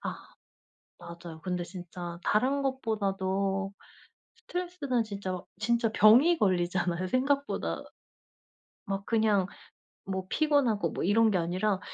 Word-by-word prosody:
아 - - -3 0.8
맞아요. 170 -1 -10
근데 180 -1 -2
진짜 175 -1 -8
다른 265 +6 +2
것보다도 195 -6 -1 0.6
스트레스는 355 - -2
진짜 195 -3 -4 0.2
진짜 230 0 +1
병이 255 +12 +6
걸리잖아요. 180 -1 +1
생각보다 280 +5 0 1.0
막 195 0 -3
그냥 215 -4 +2 0.6
뭐 190 -1 -3
피곤하고 285 -9 +2
뭐 - - -3
이런 220 +3 +4
게 190 - +2
아니라 185 +3 0
200 Hz, 245 characters per minute, -29 LUFS, 185-240 Hz, 1.0 s, 병이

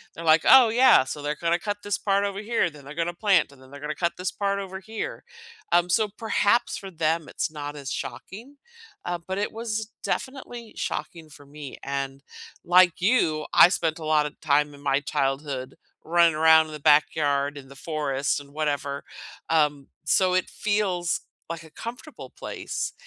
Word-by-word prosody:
They're 165 - -7
like, 160 0 +6
"Oh, 260 -3 +8
yeah. 245 - +6
So 145 +3 -6
they're 150 +1 -2
gonna 170 +2 0
cut 205 +2 -3
this 205 -1 -1
part 200 -1 +1
over 200 -1 -2
here, 220 -4 0
then 145 -2 -14
they're 140 - -9
gonna 170 +1 -1
plant, 185 -5 +2
and 135 -2 -18
then 130 - -16
they're 140 +1 -11
gonna 150 +1 -4
cut 170 +1 0
this 180 +1 -2
part 200 -1 -1
over 190 -1 -6
here." 225 - -6 0.5
Um, 175 +1 +4
so 215 +4 +2
perhaps 220 +2 +1
for 195 - -8
them, 160 -1 -1
it's - - -3
not 145 -1 -6
as 140 -2 -6
shocking, 215 - -7 0.5
uh, 175 0 -2
but 190 +1 -3
it 205 - -1
was 220 -1 -4
definitely 245 -4 -5
shocking 160 +1 -5
for 145 -1 -15
me. 145 -1 -10
And 140 0 -4 0.4
like 180 0 +5
you, 170 -8 +2
I - - +8
spent 165 -2 -1
a 155 - -7
lot 155 -1 +3
of 150 - -7
time 150 0 +2
in 140 - -14
my 140 0 +1
childhood 135 -1 -2 0.3
running 170 0 +4
around 160 0 +6
in 155 - -10
the 150 - -7
backyard, 145 -1 +2
in 135 -1 -10
the 140 - -14
forest, 145 -2 -2
and 140 -1 -14
whatever. 145 -2 -2 0.5
Um, 150 -3 +1 0.2
so 185 -1 +3
it 185 - +1
feels 195 -5 -1 0.3
like 165 -1 -6
a 160 - -14
comfortable 245 - -9
place, - - -5
160 Hz, 185 wpm, -25 LUFS, 145-200 Hz, 0.5 s, Oh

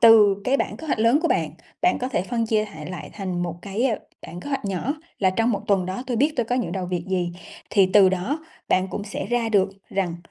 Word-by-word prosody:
từ 215 -4 +8
cái 265 +2 +3
bảng - - -2
kế 320 - -9
hoạch 280 - 0
lớn 230 +7 +4
của 335 - +2
bạn, - - +1 0.3
bạn 360 - +3
có 255 - -2
thể 240 -9 0
phân 230 +3 -1
chia 215 -1 +2
hại 155 -8 -9
lại 180 - -7
thành 185 -4 -3
một 170 -2 -2
cái, 205 +5 -1
ơ, 235 -5 +2 0.3
bảng 175 - -8
kế 285 - -7
hoạch 275 -5 -2
nhỏ, 200 +9 -1 0.2
là 190 -2 +3
trong 225 +5 +1
một 205 - 0
tuần 195 -3 +2
đó 190 +6 -3
tôi 245 -2 -1
biết 290 +6 +3
tôi 240 - +2
có 245 - 0
những 250 - -1
đầu 185 -2 -2
việc 175 -1 -2
gì, 180 -2 0 0.4
thì 195 -2 +5
từ 200 -2 +8
đó 190 - -1 0.3
bạn 185 +1 +2
cũng 205 - -4
sẽ 210 - -4
ra 240 -2 +1
được 200 -3 +3 0.2
rằng 180 -3 -1
205 Hz, 260 wpm, -24 LUFS, 185-240 Hz, 0.4 s, từ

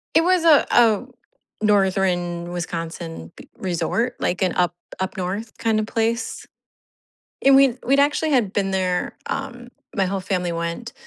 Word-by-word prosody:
It 320 - +6
was 360 -1 +2
a 310 -3 +6
a 230 -1 +4 0.6
Northern 185 -4 +1
Wisconsin 165 - -5
b - - -14
resort, 190 +7 -1
like 180 - -1
an 185 -2 +2
up 175 -2 +2 0.3
up 190 0 -3
north 195 +5 -4
kind 225 -1 +1
of 215 - -1
place. 225 +2 -2 1.0
And 270 0 +6
we'd 270 -2 +4
we'd 275 +3 +3
actually 295 +2 +2
had 230 -8 +2
been 195 -2 0
there, 185 -2 -1
um, 245 -3 -5 0.3
my 195 - +2
whole 195 +1 -2
family 180 -2 -2
went 170 +8 -4
195 Hz, 150 wpm, -22 LUFS, 180-245 Hz, 1.0 s, It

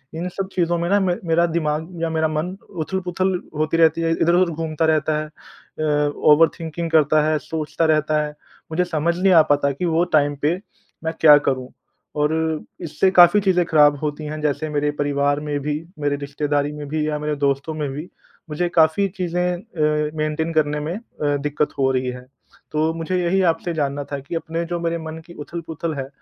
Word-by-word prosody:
इन 170 +3 -3
सब 190 +1 -4
चीज़ 175 -2 0
में 170 0 0
ना 205 - +4
मेरा 175 -3 +1
दिमाग 160 0 -1
या 165 - 0
मेरा 160 0 +1
मन 155 +5 -2 0.3
उथल-पुथल 185 +1 -1 0.2
होती 155 +2 0
रहती 165 0 +4
है, 165 - +1
इधर-उधर 170 +1 +2
घूमता 160 0 -1
रहता 155 -1 +2
है। 155 - -3
अ, 150 -1 -3 0.2
ओवर 160 +2 +6
थिंकिंग 165 +1 -4
करता 155 -1 +4
है, 155 - +2
सोचता 160 +1 -2
रहता 155 0 +1
है, 150 - -6 0.4
मुझे 180 +3 +1
समझ 170 0 -1
नहीं 190 -1 +4
आ 165 - +8
पाता 140 -1 +2
कि 140 +6 -3
वो 165 0 +2
टाइम 145 0 +1
पे 155 +4 +2 0.5
मैं 160 0 -2
क्या 150 -2 +9
करूँ? 130 -1 -3 0.5
और 150 +1 +1 0.5
इससे 170 +3 +1
काफ़ी 175 +2 +7
चीज़ें 180 -3 +2
ख़राब 150 -2 +5
होती 150 0 -3
हैं, 155 +1 -5
जैसे 150 +1 -1
मेरे 145 0 0
परिवार 145 0 +1
में 150 -1 -3
भी, 150 +1 -2 0.2
मेरे 145 -1 0
रिश्तेदारी 145 0 -1
में 150 -1 -7
भी 155 0 -1
या 150 -1 -2
मेरे 150 0 -2
दोस्तों 140 +2 0
में 150 -2 -3
भी 150 +6 -7 0.4
मुझे 155 +4 -1
काफ़ी 160 +5 +4
चीज़ें 180 0 0
अ, 150 -6 -1
मेंटेन 155 +2 -1
करने 150 -1 +1
में 155 +4 -3
अ, 150 -10 -3
दिक्कत 150 +1 -1
हो 135 -1 +3
रही 130 -1 -1
है। 125 0 -8 0.5
तो 155 +1 +1
मुझे 165 +3 -2
यही 185 +3 +2
आपसे 165 +1 -5
जानना 145 -2 -2
था 140 - -2
कि 140 +5 -7
अपने 165 +1 -3
जो 175 0 -3
मेरे 170 0 -1
मन 160 0 -7
की 170 - -13
उथल-पुथल 165 0 -5
है 135 -1 -4
155 Hz, 195 wpm, -21 LUFS, 150-170 Hz, 0.5 s, क्या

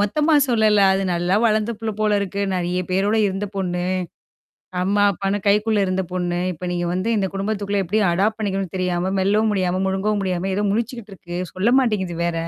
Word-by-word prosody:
மொத்தமா 300 +10 +2
சொல்லல. 215 -3 +3
அது 195 +1 0
நல்லா 175 +2 0
வளர்ந்த 220 +1 +2
புள்ள 220 -1 -3
போல 210 -1 +2
இருக்கு. 200 0 -3
நெறைய 180 0 -1
பேரோட 200 +4 +1
இருந்த 195 +2 -2
பொண்ணு. 180 -2 -2 1.0
அம்மா, 200 +2 +1
அப்பான்னு 195 +2 -2
கைக்குள்ள 210 +1 +3
இருந்த 185 0 -1
பொண்ணு. 175 -1 -1
இப்ப 180 +2 -7
நீங்க 175 0 -1
வந்து 185 +5 -1
இந்த 195 -1 0
குடும்பத்துக்குள்ள 200 0 -1
எப்டி 205 +5 0
அடாப்ட் 205 +5 +1
பண்ணிக்கணும்னு 195 -3 -2
தெரியாம, 180 0 -1
மெல்லவும் 210 +3 +2
முடியாம, 185 -1 0
முழுங்கவும் 200 +2 0
முடியாம 185 +1 -1
ஏதோ 205 +1 0
முழிச்சுக்கிட்டு 230 -1 -3
இருக்கு. 175 0 -7 0.2
சொல்ல 220 +7 +2
மாட்டேங்குது 190 -9 -1
வேற. 165 -1 -2
195 Hz, 175 wpm, -21 LUFS, 180-210 Hz, 1.0 s, சொல்லல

